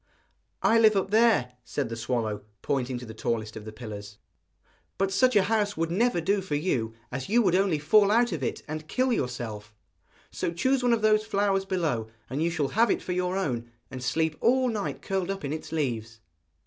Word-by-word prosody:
'I 230 - +5
live 220 -2 +6
up 195 0 0
there,' 220 - +4
said 135 0 -3
the 115 - -4
swallow, 115 -3 -2 0.2
pointing 130 -2 -1
to 125 - -8
the 110 - -8
tallest 110 -1 -2
of 110 -1 -8
the 110 - -7
pillars. 105 -2 -8 0.8
'But 195 0 +1
such 250 +5 +3
a 205 - +6
house 205 -1 0
would 165 0 -1
never 225 +1 +2
do 195 +4 +1
for 180 -6 -3
you, 125 -8 -1 0.2
as 130 +4 -4
you 235 +3 +4
would 180 - +2
only 190 -3 +3
fall 200 +8 +4
out 235 +2 +3
of 165 -5 -3
it 125 - -3
and 155 0 -5
kill 255 +6 +1
yourself. 115 - -4 0.6
So - - -2
choose 260 +10 +1
one 245 -1 +3
of 225 -2 0
those 215 0 +4
flowers 200 -2 +1
below, 160 -13 -1 0.2
and 140 +4 -2
you 165 - +2
shall 155 -5 -1
have 230 +3 +3
it - - 0
for - - -4
your 180 +1 0
own, 120 -11 -2 0.2
and 130 -1 -6
sleep 160 +5 0
all 255 +2 +3
night 210 -3 -3
curled 190 -1 -1
up 195 -5 -3
in 140 - -2
its 155 - -6
leaves.' 115 -8 -2
165 Hz, 210 wpm, -27 LUFS, 125-205 Hz, 0.8 s, live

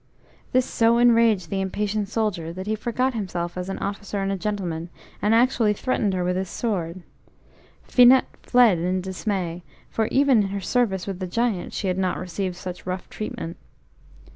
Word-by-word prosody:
This 255 0 +3
so 230 0 +3
enraged 230 -7 +4
the 195 - 0
impatient 205 +2 -1
soldier, 205 -8 -1
that 185 +2 -6
he 215 - -1
forgot 240 +4 -1
himself 175 -5 -3
as 180 +1 -4
an 195 - -3
officer 200 0 -4
and 195 0 -1
a - - 0
gentleman, 180 -5 -3 0.3
and 210 +2 +3
actually 230 -3 +3
threatened 210 -3 0
her 180 - 0
with 180 +1 0
his 190 0 -2
sword. 185 -6 -3 0.8
Finette 250 +1 +5
fled 240 -8 +4
in 180 +2 0
dismay, 185 -2 -3 0.3
for 220 -1 0
even 270 -4 +4
in 195 - -1
her 200 +1 -3
service 195 -2 0
with 195 -2 -5
the 185 - -3
Giant 225 -1 -1
she 200 - -2
had 185 0 0
not 185 -1 0
received 185 +1 -3
such 180 0 -8
rough 185 0 -4
treatment. 170 -5 -5
195 Hz, 175 wpm, -24 LUFS, 180-225 Hz, 0.8 s, Finette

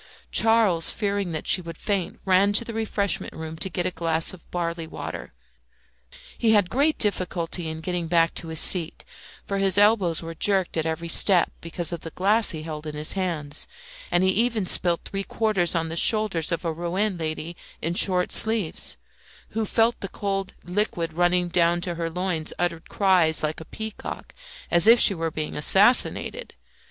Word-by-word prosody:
Charles, 220 -7 +3
fearing 200 -3 -2
that 155 - -5
she 185 - +5
would 165 -1 -9
faint, 195 -4 -3
ran 195 +2 +3
to 225 +3 +3
the 230 - -7
refreshment 210 -3 -1
room 160 0 -7
to 190 - 0
get 175 0 -3
a 185 - -1
glass 165 -1 -1
of 180 - -15
barley 170 -2 -4
water. - - -8 1.0
He 225 -1 +2
had 205 -4 +2
great 290 +4 +2
difficulty 180 -4 -1
in 160 0 -7
getting 175 0 -3
back 165 0 +2
to 165 - -5
his 160 -1 0
seat, 170 -3 +2 0.4
for 200 0 -3
his 195 -1 +3
elbows 205 -6 +3
were 165 0 -7
jerked 190 +1 0
at 160 0 -1
every 160 +1 -4
step 175 +1 +5
because 170 +1 -4
of 170 - -4
the 165 - -8
glass 205 +7 +1
he 155 -3 -2
held 155 -1 -7
in 150 - -6
his 150 +1 0
hands, 165 -7 -2 0.4
and 175 - +1
he 190 - +3
even 225 0 0
spilt 175 -1 +3
three 195 - -3
fourths 195 -4 0
on 165 -1 -1
the 165 - -5
shoulders 195 -4 +3
of 170 +1 -3
a 165 - -1
Rouen 180 +5 -2
lady 160 +1 -5 0.2
in 165 +2 -3
short 180 0 +2
sleeves, 220 -7 +2 0.5
who 220 -1 -3
feeling 225 +3 +2
the 195 - -6
cold 195 0 -4
liquid 175 -3 -2
running 175 +1 +1
down 175 0 +1
to 175 0 -2
her 165 0 -4
loins, 170 -2 -3
uttered 170 -2 -3
cries 180 -6 +2
like 155 0 -2
a - - -10
peacock, 220 +4 -8 0.4
as 170 +3 +4
if 235 +1 +7
she 200 - +5
were 165 -2 -3
being 155 -1 -5
assassinated. 240 - +2
175 Hz, 185 wpm, -24 LUFS, 165-200 Hz, 1.0 s, if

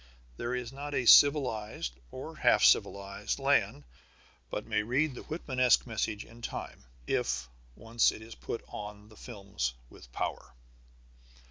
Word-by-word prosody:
There 120 - -3
is 125 0 -5
not 145 +1 -5
a 125 - 0
civilized 115 - +5 0.2
or - - -8
half - - +4
civilized 100 0 +2
land 70 - +1 0.7
but 105 - -4
may 105 -2 0
read 130 +7 0
the - - -8
Whitmanesque 130 -6 +1
message 110 -2 -3
in 115 +1 -15
time, - - -6 0.2
if 60 -1 -1 0.3
once 115 +1 +2
it 110 - -10
is 115 +1 -10
put 115 - -6
on 105 0 -8
the 110 - -16
films 100 - -4 0.2
with - - -15
power. 65 +1 -4
115 Hz, 140 wpm, -30 LUFS, 105-125 Hz, 0.7 s, civilized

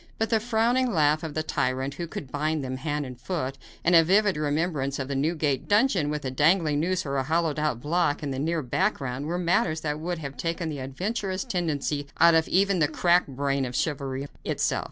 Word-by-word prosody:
But 225 0 -1
the 225 - +4
frowning 240 +3 +1
laugh 155 -3 +3
of 160 -3 -6
the 155 - 0
tyrant, 135 -2 -1
who 170 +2 -5
could 140 -4 -7
bind 150 0 -1
him 130 0 -4
hand 145 +1 -2
and 125 -2 -9
foot, 135 -7 -3 0.2
and 175 - +3
a 165 -1 +8
vivid 200 +3 +3
remembrance 150 -2 -1
of 135 - -3
the 140 - -3
Newgate 145 -1 0
dungeon, 205 - +3
with 150 -1 -3
a 130 - -2
dangling 155 +2 +3
noose 185 +3 0
or 140 -1 -2
a 135 - +1
hollowed 160 +1 0
out 150 -6 0
block 155 0 0
in 140 - -2
the 130 - -3
near 160 +2 -1
background, 135 - -1
were 175 +2 -1
matters 170 -2 +1
that 150 -1 -2
would 175 +2 -3
have 140 -3 -7
taken 165 0 -2
the 145 -3 -5
adventurous 185 - -3
tendency 150 -4 -2
out 170 0 +7
of 160 0 +3
even 195 0 +2
the 150 - +4
cracked 175 +3 +3
brain 140 0 -1
of 125 -1 -4
chivalry 140 -2 -2 0.2
itself. - - 0
155 Hz, 215 wpm, -26 LUFS, 140-175 Hz, 0.2 s, a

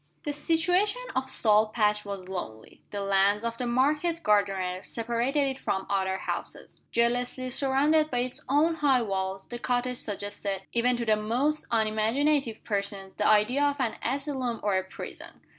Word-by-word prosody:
The 295 - -2
situation 355 +10 +1
of 260 0 -1
Salt 215 -3 +3
Patch 210 -2 +1
was 195 -2 -6
lonely. 110 -13 -7
The 205 - -4
lands 200 +2 +2
of 230 0 -3
the 250 - -1
market 300 +7 +1
gardeners 195 -3 +1
separated 240 +5 0
it 265 0 -3
from 190 -6 -2
other 190 -1 0
houses. - - -6
Jealously 245 +2 0
surrounded 290 +4 +3
by 245 -3 0
its 250 0 -3
own 315 +4 +3
high 270 -5 +3
walls, 190 -2 -3
the 240 - -5
cottage 250 0 -1
suggested, 205 -2 -4
even 245 +1 +2
to 235 - -2
the 215 -1 +4
most 245 +9 -1
unimaginative 230 +4 +1
persons, 200 -2 -3
the 210 - +2
idea 215 +6 +4
of 285 -1 +2
an 240 -4 0
asylum 260 -2 -2
or 205 -2 +1
a 190 - +1
prison. 190 - -9
235 Hz, 160 wpm, -28 LUFS, 205-270 Hz, -, the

